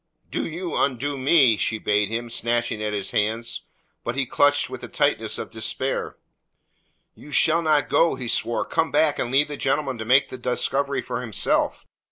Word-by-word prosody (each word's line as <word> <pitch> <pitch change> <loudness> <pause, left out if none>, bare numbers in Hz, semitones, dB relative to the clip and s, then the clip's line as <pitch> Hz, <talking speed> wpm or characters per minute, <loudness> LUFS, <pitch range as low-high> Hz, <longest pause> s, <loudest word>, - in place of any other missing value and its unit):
"Do - - -2
you 170 +2 -5
undo 140 +1 0
me," 130 -4 +4
she 110 - 0
bade 105 -1 +1
him, 115 +1 -3
snatching 120 -1 -1
at 105 0 -1
his 100 -2 -3
hands. 110 +2 -1 0.4
But - - -3
he 140 -1 0
clutched 145 +3 +3
with - - -8
the - - -7
tightness - - 0
of - - -6
despair. - - -2 1.0
"You - - -14
shall 160 +3 +4
not 155 -3 +2
go," 165 - +3
he 125 - -6
swore. 115 +1 0
"Come 160 - 0
back 150 -2 +2
and 120 - -1
leave 135 +3 +3
the 145 -1 -6
gentleman 135 -2 -1
to 110 - -4
make 130 +4 +4
the 130 - -8
discovery 135 +3 -1
for 125 -1 -4
himself. 115 -5 -1
130 Hz, 185 wpm, -24 LUFS, 115-145 Hz, 1.0 s, me